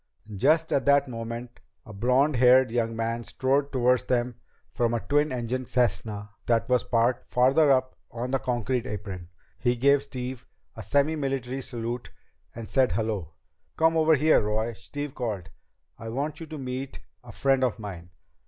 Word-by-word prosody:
Just 155 +10 +2
at 135 - +1
that 140 0 +4
moment 115 0 -6 0.3
a 110 - -10
blond 125 +7 +2
haired 125 0 +6
young 115 -1 0
man 115 +1 -2
strode 135 +4 0
toward 125 -1 +2
them 125 0 0 0.4
from 120 -1 0
a - - 0
twin 145 +4 +1
engine 125 +1 -2
Cessna 105 -4 -1 0.2
that 115 +1 +2
was 125 -2 +2
parked 120 +1 +1
farther 135 +5 +4
up 130 -1 +1
on 120 +2 -5
the 135 - +1
concrete 125 0 -1
apron. 100 -5 -6 0.3
He 120 0 +1
gave 140 +3 +4
Steve 130 -2 -6 0.3
a - - -7
semimilitary 135 -3 0
salute 120 -1 -5 0.5
and 115 -1 -7
said, 130 -2 +2
"Hello!" 105 -8 -2 0.4
"Come 160 0 +3
over 160 0 +5
here, 155 +3 +4
Roy," 110 +2 -1
Steve 135 +9 -6
called. 105 -9 -4 0.5
"I 115 - -6
want 140 +6 -3
you 165 - -7
to 155 0 -7
meet 130 0 -5 0.2
a - - -11
friend 135 -1 +2
of 125 -4 +1
mine." 90 -6 -8
125 Hz, 160 wpm, -26 LUFS, 115-135 Hz, 0.5 s, haired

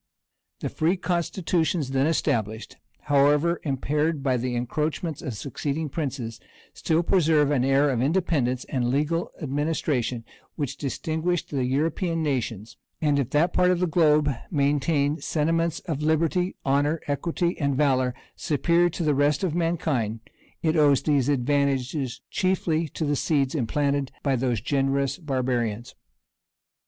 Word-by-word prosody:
The - - -2
free 170 +5 +1
constitutions 170 -4 -1
then 135 +2 +2
established, 110 -8 -1 0.3
however 145 +4 +3
impaired 150 +2 -1
by 130 -2 +2
the 125 0 -2
encroachments 150 +5 -2
of 125 - -5
succeeding 145 +6 -3
princes, 130 -6 -4 0.3
still 165 +1 0
preserve 160 -5 +3
an 130 -4 +2
air 135 +2 +3
of 120 -2 0
independence 140 -5 0
and 125 -2 -1
legal 150 +6 0
administration, 140 -5 -1 0.3
which 140 -3 -3
distinguished 160 +5 -2
the 135 -4 0
European 165 +5 0
nations; 120 -7 -3 0.2
and 145 -2 +2
if 135 - -1
that 165 +4 +2
part 180 - +3
of 180 -1 +2
the 180 - +2
globe 155 -3 +3 0.2
maintain 145 0 +1
sentiments 165 +1 0
of 155 -5 -4
liberty, 165 +4 +1
honor, 145 +4 +2
equity, 170 +4 -1
and 140 -3 +1
valor 130 -3 +2 0.2
superior 170 +3 +2
to 170 - -4
the 150 -2 +2
rest 145 +2 +2
of 180 -5 0
mankind, 155 -10 -1 0.4
it 160 0 +2
owes 145 -3 +4
these 145 -3 +2
advantages 140 -1 0
chiefly 170 -3 0
to 160 - -3
the 145 0 +1
seeds 140 -2 +1
implanted 140 0 0
by 135 -2 +2
those 120 -4 0
generous 135 - 0
barbarians. 125 - -2
145 Hz, 135 wpm, -25 LUFS, 135-160 Hz, 0.4 s, owes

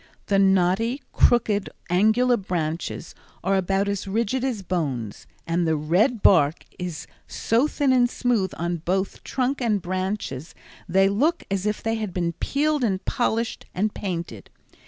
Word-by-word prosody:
The 200 -1 +2
knotty, 195 +6 +3
crooked, 210 -4 +3 0.2
angular 220 +7 +4
branches 170 -5 -3 0.3
are 195 +2 +2
about 195 +1 +1
as 200 0 -2
rigid 230 +5 0
as 240 -7 -2
bones, 140 - -3 0.2
and 170 0 0
the 160 - +2
red 185 - +1
bark 160 -4 +4
is 175 -4 -5 0.2
so 235 +6 +1
thin 285 -3 +1
and 245 -1 +4
smooth 235 -7 0
on 170 +1 -1
both 190 +4 -2
trunk 265 +1 -1
and 220 -4 +1
branches, 185 -5 -4 0.3
they 195 +2 +4
look 285 - +1
as 195 +1 0
if 210 - -2
they 225 0 0
had 215 -4 -4
been 170 -2 0
peeled 295 0 0
and 195 -5 -1
polished 230 -1 -1
and 210 +3 0
painted. 170 - -5
195 Hz, 150 wpm, -24 LUFS, 175-230 Hz, 0.3 s, angular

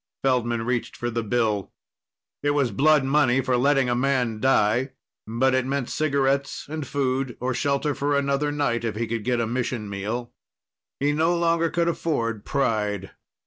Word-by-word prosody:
Feldman 120 -3 +1
reached 120 0 -2
for 120 0 -3
the 115 0 -1
bill. 110 -3 0 0.7
It 145 0 +1
was 135 -4 +2
blood 150 0 +4
money 135 -2 +3
for 130 -1 +1
letting 135 +1 +3
a 120 - +1
man 125 -3 0
die 130 +1 +2 0.3
but 125 +4 +1
it 130 0 +2
meant 135 -1 -2
cigarettes 140 -2 0
and 155 -1 -5
food 135 -2 -1
or 130 +1 -1
shelter 140 +3 0
for 145 +1 0
another 140 +1 0
night, 120 -6 0
if 110 -3 -2
he 115 +2 -1
could 115 -1 -3
get 120 0 0
a 115 - +1
mission 120 -2 -2
meal. 110 +5 -4 0.7
He 145 +1 +2
no 165 +4 +2
longer 165 -1 +2
could 170 0 0
afford 115 -11 -1
pride. 105 -8 -1
130 Hz, 170 wpm, -24 LUFS, 115-140 Hz, 0.7 s, blood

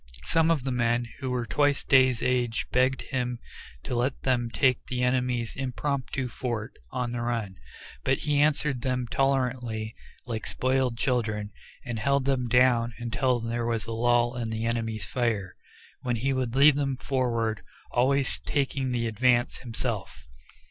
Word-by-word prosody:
Some 165 0 +3
of 160 -6 +2
the 135 - -1
men 120 -1 +1
who 130 -2 -3
were 125 -1 -1
twice 145 +2 +2
Day's 130 -3 +4
age 125 -2 +1
begged 130 +1 +2
him 125 -2 -2 0.5
to - - -4
let 125 +3 0
them 120 -3 +1
take 120 +4 +2
the 125 -1 -1
enemy's 125 -2 0
impromptu 135 0 -2
fort 120 -3 -4 0.2
on 125 - -2
the 120 -1 -3
run, 115 -5 -2 0.5
but 135 - +2
he 145 -1 +1
answered 150 -3 +1
them 125 0 -1
tolerantly 125 -5 0 0.3
like 110 -3 -4
spoiled 130 -2 0
children, 110 -5 -1 0.3
and 120 -3 -3
held 140 +3 +1
them 130 -3 +1
down 120 -1 +3
until 120 +1 0
there 115 +1 -2
was 115 -3 -1
a 115 - -6
lull 120 +1 +2
in 120 -2 -3
the 110 0 -2
enemy's 110 -3 -2
fire, 110 -5 -1 0.5
when 125 -1 -1
he 135 +4 0
would 130 -2 -2
lead 140 +2 +7
them 135 -2 -1
forward, 115 -5 -1 0.3
always 135 +2 +2
taking 135 -2 -1
the 120 -2 0
advance 120 +2 +2
himself. 115 - -4
125 Hz, 155 wpm, -27 LUFS, 115-130 Hz, 0.5 s, lead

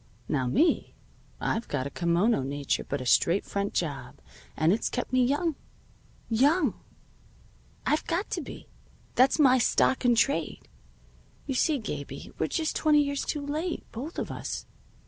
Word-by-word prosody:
Now 130 -4 0
me, 305 - +2 0.4
I've 230 +1 -1
got 130 -3 -2
a 140 - -5
kimono 175 - +2
nature 140 +1 -1
but 140 -1 -3
a - - -5
straight 170 +9 +3
front 200 0 -3
job, 150 -5 -3 0.4
and 160 +4 +4
it's 220 - -1
kept 245 - -4
me 255 0 +4
young. 295 +6 +1 0.7
Young! 275 - +3 1.1
I've 305 - +1
got 345 +5 -1
to - - -1
be. - - -10 0.5
That's 255 +2 +4
my 260 -4 +5
stock 260 +2 +2
in 245 -1 +4
trade. 225 - 0 0.8
You 275 - -2
see, 295 +4 +2
Gabie, 215 - -6
we're - - +1
just 320 -2 -1
twenty 300 -1 +4
years 280 -1 -2
late, 300 +4 -3
both 275 +9 -7
of - - -3
us. - - -5
250 Hz, 150 wpm, -28 LUFS, -, 1.1 s, my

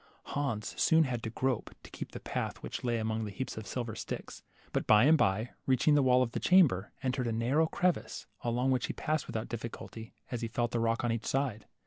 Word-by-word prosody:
Hans 135 -7 -2
soon 160 0 +5
had 125 -5 -2
to 110 - -3
grope, 130 +1 -2
to - - -13
keep - - -7
the - - -7
path - - -4
which - - -5
lay 120 -1 +1
among 110 0 -1
the 105 - -4
heaps 130 +7 -5
of 110 -2 -7
silver 120 +1 -3
sticks; 110 - -6 0.3
but - - -1
by 105 0 +7
and 155 +4 +7
by, 110 -3 +1 0.2
reaching 135 +3 +4
the 145 - +5
wall 130 -1 +5
of 115 - -3
the - - -2
chamber, 145 - +4
entered 130 -1 0
a - - 0
narrow 125 +8 +2
crevice, 180 +2 -1 0.2
along 125 +2 +1
which 125 -2 +1
he - - -3
passed 155 -1 -1
with 120 - -3
out 110 - -4
difficulty, 115 -1 -7 0.2
as 120 -2 -3
he 115 - -1
felt 120 +1 -1
the 120 - 0
rock 115 0 +1
on 120 - +1
each 115 -1 -3
side. 130 -6 -1
120 Hz, 235 wpm, -31 LUFS, 110-130 Hz, 0.3 s, by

